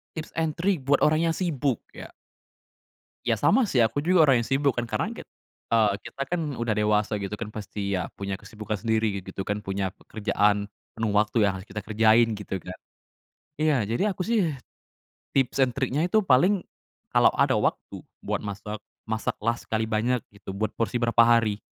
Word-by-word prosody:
Tips 160 Hz, 0 st, -7 dB
and 160 Hz, -2 st, -1 dB
trik 180 Hz, -3 st, +1 dB
buat 140 Hz, +1 st, +3 dB
orang 155 Hz, +2 st, +2 dB
yang -, -, -1 dB
sibuk 145 Hz, -, 0 dB, 0.2 s
ya? -, -, -9 dB, 1.2 s
Ya -, -, +3 dB
sama 225 Hz, +1 st, +3 dB
sih 125 Hz, -8 st, +4 dB
aku 115 Hz, +6 st, 0 dB
juga 170 Hz, +1 st, +4 dB
orang 135 Hz, -5 st, +4 dB
yang 115 Hz, -, -4 dB
sibuk 140 Hz, +1 st, +2 dB
kan 120 Hz, 0 st, -3 dB
karena -, -, -1 dB
kit -, -, -10 dB, 0.4 s
eee, 110 Hz, -3 st, +3 dB
kita -, -, -11 dB
kan 175 Hz, -1 st, 0 dB, 0.2 s
udah 120 Hz, -1 st, -1 dB
dewasa 105 Hz, 0 st, +1 dB
gitu 100 Hz, +1 st, -4 dB
kan, 110 Hz, -2 st, -5 dB
pasti 100 Hz, -2 st, -4 dB
ya 90 Hz, -2 st, -2 dB
punya 100 Hz, 0 st, -3 dB
kesibukan 110 Hz, 0 st, -6 dB
sendiri 110 Hz, -3 st, 0 dB
gitu -, -, -20 dB
gitu 95 Hz, -, -4 dB
kan, 105 Hz, +1 st, -2 dB
punya 95 Hz, -1 st, -3 dB
pekerjaan 105 Hz, -1 st, 0 dB, 0.3 s
penuh 110 Hz, -2 st, -1 dB
waktu 105 Hz, +3 st, +2 dB
yang 100 Hz, -, +3 dB
harus 95 Hz, +1 st, -9 dB
kita 100 Hz, 0 st, -6 dB
kerjain, 110 Hz, +2 st, +4 dB
gitu 105 Hz, -2 st, -5 dB
kan. 90 Hz, -, -8 dB, 0.9 s
Iya 155 Hz, -1 st, +3 dB
jadi 115 Hz, +10 st, 0 dB
aku 185 Hz, -, -6 dB
sih, 230 Hz, +4 st, +1 dB, 1.0 s
tips 135 Hz, -3 st, +1 dB
and 130 Hz, -2 st, +3 dB
triknya 135 Hz, +2 st, 0 dB
itu 215 Hz, +4 st, +3 dB
paling, 180 Hz, +6 st, +4 dB, 0.5 s
kalau -, -, +5 dB
ada -, -, +3 dB
waktu -, -, -2 dB, 0.2 s
buat -, -, -1 dB
masak, 105 Hz, +1 st, -5 dB, 0.3 s
masak 110 Hz, 0 st, -1 dB
lah 115 Hz, +1 st, +1 dB
sekali 110 Hz, 0 st, -2 dB
banyak 120 Hz, +3 st, +1 dB
gitu, 100 Hz, -1 st, -9 dB
buat 110 Hz, +1 st, -1 dB
porsi 115 Hz, +2 st, -1 dB
berapa 115 Hz, 0 st, +5 dB
hari. 115 Hz, -3 st, +3 dB
115 Hz, 185 wpm, -26 LUFS, 105-140 Hz, 1.2 s, kalau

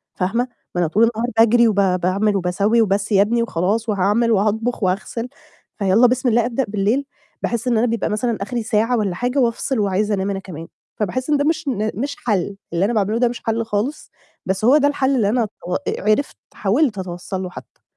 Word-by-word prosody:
فاهمة؟ 230 Hz, +7 st, 0 dB, 0.3 s
ما 175 Hz, -, +1 dB
أنا 170 Hz, -, +2 dB
طول 210 Hz, +8 st, +2 dB
النهار 230 Hz, +2 st, -1 dB
باجري، 230 Hz, +1 st, +5 dB
وب 215 Hz, -, +1 dB
باعمل، 190 Hz, +2 st, +1 dB
وباسوّي، 200 Hz, +5 st, +2 dB
"وبس 205 Hz, 0 st, 0 dB
يا 200 Hz, -1 st, +5 dB
ابني." 235 Hz, +3 st, +2 dB
وخلاص 220 Hz, +3 st, -1 dB
وهاعمل، 210 Hz, +4 st, +2 dB
وهاطبخ، 220 Hz, +3 st, 0 dB
وهاغسل. 205 Hz, +6 st, -2 dB, 0.5 s
فيالّا 205 Hz, +4 st, +4 dB
بسم 250 Hz, +1 st, +1 dB
الله، 235 Hz, 0 st, +3 dB
أبدأ 250 Hz, +2 st, -1 dB
بالليل، 215 Hz, +7 st, 0 dB, 0.4 s
باحس 235 Hz, +1 st, -2 dB
إن 235 Hz, -2 st, +2 dB
أنا 240 Hz, -, +2 dB
بيبقى 230 Hz, 0 st, -1 dB
مثلًا 220 Hz, +2 st, -1 dB
آخري 235 Hz, +2 st, -3 dB
ساعة 230 Hz, +2 st, +1 dB
والّا 200 Hz, -5 st, -1 dB
حاجة، 245 Hz, +7 st, -1 dB
وأفصل، 245 Hz, +1 st, 0 dB
وعايزة 205 Hz, +1 st, 0 dB
أنام 195 Hz, 0 st, -1 dB
أنا 195 Hz, -1 st, -2 dB
كمان، 165 Hz, -4 st, -9 dB, 0.3 s
فباحس 255 Hz, +7 st, -2 dB
إن 295 Hz, -, +3 dB
ده 285 Hz, -, 0 dB
مش 315 Hz, 0 st, 0 dB
ن 215 Hz, -4 st, -1 dB
مش 280 Hz, +7 st, -3 dB
حل، 200 Hz, -3 st, 0 dB, 0.2 s
اللي 170 Hz, +3 st, +2 dB
أنا 235 Hz, -, 0 dB
باعمله 215 Hz, 0 st, +1 dB
ده 245 Hz, -, +3 dB
مش 240 Hz, -, -5 dB
حل 225 Hz, 0 st, 0 dB
خالص، 225 Hz, +7 st, -3 dB, 0.3 s
بس 190 Hz, +3 st, -1 dB
هو 270 Hz, +5 st, +6 dB
ده 285 Hz, -, +3 dB
الحل 275 Hz, -1 st, +1 dB
اللي 215 Hz, -6 st, +2 dB
أنا 230 Hz, -1 st, +1 dB, 0.2 s
تَوَ 180 Hz, +1 st, -2 dB
آآ، -, -, -2 dB, 0.3 s
عرفت 280 Hz, +7 st, 0 dB, 0.2 s
حاولت 215 Hz, +2 st, +1 dB
أتوصل 185 Hz, +1 st, -5 dB
له 180 Hz, -, -5 dB
حتى. -, -, -13 dB
220 Hz, 205 wpm, -20 LUFS, 195-240 Hz, 0.5 s, هو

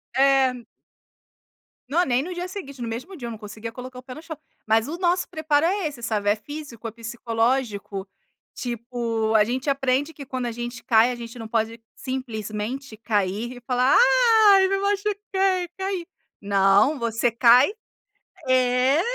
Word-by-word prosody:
É. 265 Hz, -2 st, +3 dB, 1.3 s
Não, 345 Hz, +5 st, +3 dB
nem 255 Hz, +1 st, +1 dB
no 360 Hz, +2 st, -5 dB
dia 355 Hz, +1 st, -4 dB
seguinte, 280 Hz, -10 st, -8 dB
no 235 Hz, -, -3 dB
mesmo 255 Hz, +12 st, -6 dB
dia 240 Hz, -3 st, -6 dB
eu -, -, -5 dB
não 220 Hz, -, -7 dB
conseguia 215 Hz, +1 st, -8 dB
colocar 250 Hz, +1 st, -9 dB
o -, -, -13 dB
pé 255 Hz, -1 st, -9 dB
no 310 Hz, -, -9 dB
chão. 320 Hz, -2 st, -8 dB, 0.3 s
Mas 225 Hz, +3 st, +3 dB
o 335 Hz, +3 st, -5 dB
nosso 360 Hz, 0 st, +1 dB
preparo 315 Hz, 0 st, +1 dB
é 375 Hz, -2 st, 0 dB
esse, 275 Hz, -5 st, -8 dB
sabe, 210 Hz, -3 st, -1 dB
é 205 Hz, -, +4 dB
físico, 250 Hz, -2 st, -8 dB
é -, -, -5 dB
psicológico. 230 Hz, -3 st, -2 dB, 0.5 s
Tipo, 235 Hz, -2 st, -2 dB
a 210 Hz, -, +6 dB
gente 255 Hz, +5 st, -2 dB
aprende 275 Hz, +3 st, 0 dB
que 280 Hz, -1 st, -9 dB
quando 255 Hz, -1 st, -4 dB
a 235 Hz, -, -2 dB
gente 240 Hz, +1 st, -6 dB
cai, 230 Hz, +2 st, +4 dB
a -, -, -4 dB
gente 235 Hz, 0 st, -9 dB
não 225 Hz, -, -6 dB
pode 225 Hz, 0 st, -1 dB
simplesmente 230 Hz, -1 st, -5 dB
cair 215 Hz, +2 st, -1 dB
e -, -, -12 dB
falar: 250 Hz, +1 st, +2 dB, 0.6 s
"Ai! 385 Hz, -1 st, +6 dB
Me 390 Hz, 0 st, 0 dB
machuquei! 395 Hz, -2 st, 0 dB
Caí!" 380 Hz, -2 st, -3 dB, 0.4 s
Não, 200 Hz, +7 st, +3 dB
você 235 Hz, +1 st, 0 dB
cai 245 Hz, -, +6 dB, 0.8 s
é. 255 Hz, +3 st, +3 dB
250 Hz, 165 wpm, -24 LUFS, 230-290 Hz, 1.3 s, a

